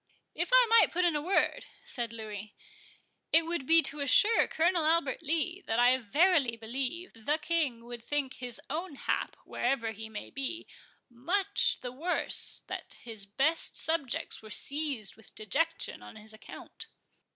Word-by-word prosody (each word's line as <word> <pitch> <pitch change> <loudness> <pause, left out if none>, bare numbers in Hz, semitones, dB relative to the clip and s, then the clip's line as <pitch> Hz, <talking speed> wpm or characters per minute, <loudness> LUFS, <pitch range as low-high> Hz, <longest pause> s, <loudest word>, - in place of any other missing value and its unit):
"If - - -2
I - - +7
might 455 0 +6
put 360 +1 +1
in 340 -3 +2
a 295 - 0
word," 390 +8 +1 0.2
said 235 -2 -4
Louis, 215 -2 -7 0.8
"it 325 0 +6
would 330 -5 -3
be 330 0 +7
to 295 - -1
assure 345 - +5
Colonel 340 +1 +2
Albert 315 -3 +1
Lee 330 +4 -1
that 225 - 0
I 245 +1 +6
verily 275 - +2
believe 270 +10 -3
the 230 +7 -1
King 300 -8 -1
would 240 -1 -8
think 285 0 -2
his 245 -2 -2
own 330 -1 -4
hap, - - -2
wherever 245 -3 -1
he 220 +1 -8
may 215 -1 -8
be, 275 +5 -3 0.4
much 370 +12 0
the 245 - -5
worse 320 +8 -1
that - - -7
his 220 -4 -7
best 280 +11 0
subjects 320 -6 -1
were 215 - -12
seized 280 -4 -1
with 220 - -12
dejection 325 +10 -1
on - - -12
his 215 0 -6
account." 215 - -10
280 Hz, 160 wpm, -30 LUFS, 230-330 Hz, 0.8 s, I